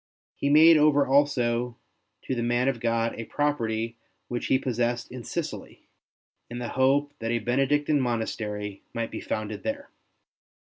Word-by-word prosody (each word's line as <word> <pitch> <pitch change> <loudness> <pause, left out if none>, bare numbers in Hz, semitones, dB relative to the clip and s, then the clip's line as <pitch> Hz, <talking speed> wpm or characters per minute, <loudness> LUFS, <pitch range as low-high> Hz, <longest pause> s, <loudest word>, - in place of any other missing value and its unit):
He 140 - -1
made 160 +2 +8
over 150 -2 +4
also 125 -4 +1 0.5
to - - -2
the 120 - -2
man 120 +2 +1
of 135 -3 0
God 115 0 0
a 115 - -4
property 115 -6 -1 0.3
which 120 -1 -3
he 130 - +4
possessed 120 -2 -2
in 125 -1 -7
Sicily, 160 +2 -6 0.6
in 120 - -6
the 120 -1 -4
hope 140 +2 +2
that 115 - -3
a 120 - +1
Benedictine 135 +5 +1
monastery 105 -4 -3
might 115 -1 -2
be - - -5
founded 110 -1 -4
there. 280 +1 -4
120 Hz, 150 wpm, -26 LUFS, 115-145 Hz, 0.6 s, made